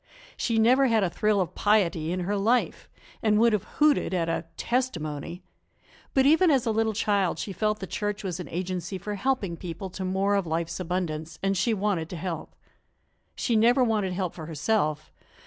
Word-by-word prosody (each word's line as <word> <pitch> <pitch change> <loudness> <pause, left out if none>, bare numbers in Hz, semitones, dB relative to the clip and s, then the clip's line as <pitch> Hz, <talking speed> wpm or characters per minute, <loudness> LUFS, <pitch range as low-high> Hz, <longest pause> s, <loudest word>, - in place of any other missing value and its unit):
She 230 -2 -1
never 255 +5 +5
had 225 -3 +3
a 180 - 0
thrill 210 +1 +1
of 180 -2 -1
piety 170 -6 +2
in 185 +1 -2
her 200 +4 -1
life, 225 +5 0 0.3
and 215 -1 +3
would 230 +1 +4
have 210 - 0
hooted 295 -10 +3
at 170 -2 0
a 165 - -2
"testimony." 175 - -2 0.7
But 265 -1 +4
even 325 +5 +5
as 270 -5 +3
a 225 - +1
little 220 0 +1
child 200 -3 +1
she 195 - -4
felt 210 +3 0
the 195 - -6
church 205 +2 -3
was 185 -2 -3
an 180 - -6
agency 180 +1 -3
for 205 +3 -5
helping 200 -5 -1
people 180 +2 -6
to 190 +1 -5
more 190 +2 +1
of 200 -4 +1
life's 165 +2 -2
abundance, 165 -3 -3
and 195 0 +1
she 205 +5 +1
wanted 190 -5 -1
to - - -6
help. 170 -1 -5 0.8
She 235 - 0
never 240 +4 +5
wanted 210 -6 0
help 180 -2 -2
for 160 -3 -8
herself. 155 -1 -1
195 Hz, 190 wpm, -26 LUFS, 175-220 Hz, 0.8 s, never